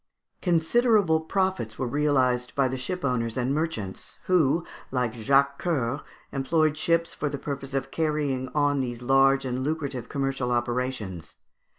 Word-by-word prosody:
Considerable 180 +1 +3
profits 185 - -1
were 130 - -1
realised 130 -2 +1
by 140 -2 +3
the 130 - -3
shipowners 125 -5 -2
and 125 +2 0
merchants, 145 - -3
who, 165 -2 +3 0.2
like 125 -3 -1
Jacques 140 +4 +2
Coeur, 140 -5 -1 0.3
employed 155 +3 +1
ships 165 +2 +1
for 145 - -2
the 140 - -4
purpose 140 -1 -5
of 135 0 -2
carrying 145 -5 -1
on 145 -1 +2
these 120 -2 -3
large 135 +1 +4
and 130 0 -2
lucrative 140 -5 -3
commercial 135 -3 -1
operations. 120 -8 -2
135 Hz, 135 wpm, -26 LUFS, 125-155 Hz, 0.3 s, large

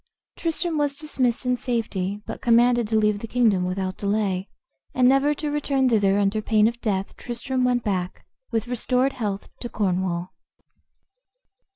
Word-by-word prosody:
Tristram 330 -1 -1
was 285 -1 0
dismissed 265 -5 0
in 250 0 +1
safety, 210 -5 -2
but - - -7
commanded 240 -1 +4
to 220 - -1
leave 210 -1 +2
the 230 - -6
kingdom 215 -7 +2
without 185 0 -3
delay, 200 -2 -1 0.5
and 250 -1 +4
never 275 +3 +3
to 295 0 -3
return 275 -3 +1
thither 200 -4 +3
under 205 +1 +1
pain 215 0 +3
of 235 +1 -4
death 195 -3 -2
Tristram 250 +2 -2
went 245 -1 +1
back, 185 -3 -3 0.2
with 225 +1 -1
restored 250 +2 0
health, 205 -6 -3
to 240 - -6
Cornwall. 185 -4 -1
230 Hz, 155 wpm, -24 LUFS, 200-255 Hz, 0.5 s, commanded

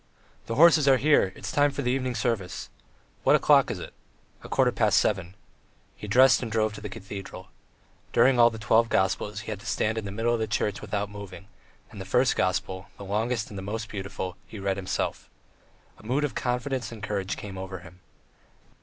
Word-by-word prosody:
"The 115 - -2
horses 160 -1 +6
are 135 -1 +6
here; 145 -9 +3
it's - - -6
time 145 0 +3
for 140 0 -4
the 125 - +1
evening 130 -1 -1
service." 115 -7 -2 0.5
"What - - +5
o'clock - - +5
is - - -3
it?" - - -9 0.5
"A - - -10
quarter - - +3
past - - +2
seven." 95 -3 0 0.6
He 105 - -9
dressed 125 +3 +5
and 115 -3 -4
drove 110 -1 +1
to - - -9
the 105 - -6
cathedral. 100 -2 -8 0.6
During 130 -2 +4
all 120 0 +8
the 115 - -8
"Twelve 115 +1 +3
Gospels" 105 +2 0
he 110 - -6
had 105 - -5
to 115 - -11
stand 110 0 0
in 110 - -7
the 100 - -5
middle 115 +3 0
of 120 - 0
the 110 - -1
church 105 -1 -1
without 105 -1 -3
moving, 100 -2 -9 0.4
and 105 -3 -9
the - - -7
first 125 +7 +2
gospel, 95 0 -1
the 100 - -9
longest 110 +3 -1
and 100 - -7
the - - -5
most 110 +3 -5
beautiful, 95 -2 -5
he 110 - -9
read 100 -1 -1
himself. 95 -1 -3 0.7
A - - -16
mood 130 +7 0
of 145 - -1
confidence 125 +1 -2
and 110 -3 -10
courage 100 -3 -2
came 100 -2 -8
over 95 -1 -6
him. 90 +1 -15
105 Hz, 205 wpm, -26 LUFS, 95-120 Hz, 0.7 s, all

